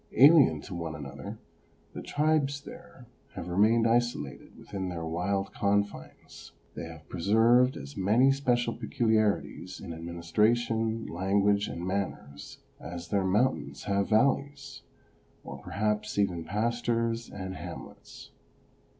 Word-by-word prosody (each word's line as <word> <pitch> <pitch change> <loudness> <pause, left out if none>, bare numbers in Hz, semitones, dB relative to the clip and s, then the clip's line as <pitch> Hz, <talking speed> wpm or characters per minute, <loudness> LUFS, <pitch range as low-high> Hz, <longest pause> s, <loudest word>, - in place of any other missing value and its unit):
Alien 135 - +6
to 95 - -9
one 85 -2 -4
another, 70 -3 -8 0.6
the - - -6
tribes 145 -2 +1
here - - -12 0.3
have 85 - -6
remained 110 +6 +3
isolated 115 - -1
within 95 -3 -5
their 85 -2 -4
wild 95 +4 -2
confines. 100 0 -3 0.2
They - - -6
have 80 -1 -11
preserved 115 +8 +3
as 70 +1 -9
many 110 +8 +4
special 120 -4 +1
peculiarities 110 -4 0
in 85 - -7
administration, 110 +7 0
language 100 +3 +1
and 85 +1 -5
manners 95 -7 -4 0.2
as 85 +2 -8
their 100 0 +1
mountains 105 +8 0
have 100 -1 0
valleys, 140 +4 +1 0.6
or - - -8
perhaps 105 +1 -2
even 90 -5 0
pastures 115 +1 -1
and 95 -1 -6
hamlets. - - -10
105 Hz, 115 wpm, -29 LUFS, 90-120 Hz, 0.6 s, Alien